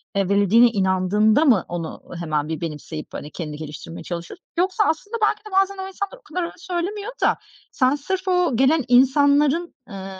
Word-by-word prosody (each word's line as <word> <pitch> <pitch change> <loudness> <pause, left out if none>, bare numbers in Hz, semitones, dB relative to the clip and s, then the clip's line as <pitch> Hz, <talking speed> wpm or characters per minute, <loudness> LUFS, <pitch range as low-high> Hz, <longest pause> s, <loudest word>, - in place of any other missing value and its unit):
eee, 195 -1 +1
verildiğine 205 +4 +5
inandığında 210 - +2
mı 225 - +4
onu 170 -2 -5 0.2
hemen 155 -3 -1
bir 160 - -4
benimseyip 155 -1 -6
hani, 150 - -7
kendini 150 -4 -6
geliştirmeye 155 +2 -8
çalışıyorsun? 175 - -7
Yoksa 375 +4 +2
aslında, 410 +9 -2
belki 425 - +2
de 425 - -10
bazen 390 +1 +2
o 380 0 -5
insanlar 400 +5 -5
o - - -24
kadar 360 - -4
öyle 335 - -5
söylemiyor 390 +4 -4
da - - +3 0.3
sen 260 +1 +2
sırf 375 +6 -4
o 360 -8 +2
gelen 275 +3 +3
insanların, 285 +6 +3
ııı, 195 -1 -8
260 Hz, 175 wpm, -22 LUFS, -, 0.3 s, verildiğine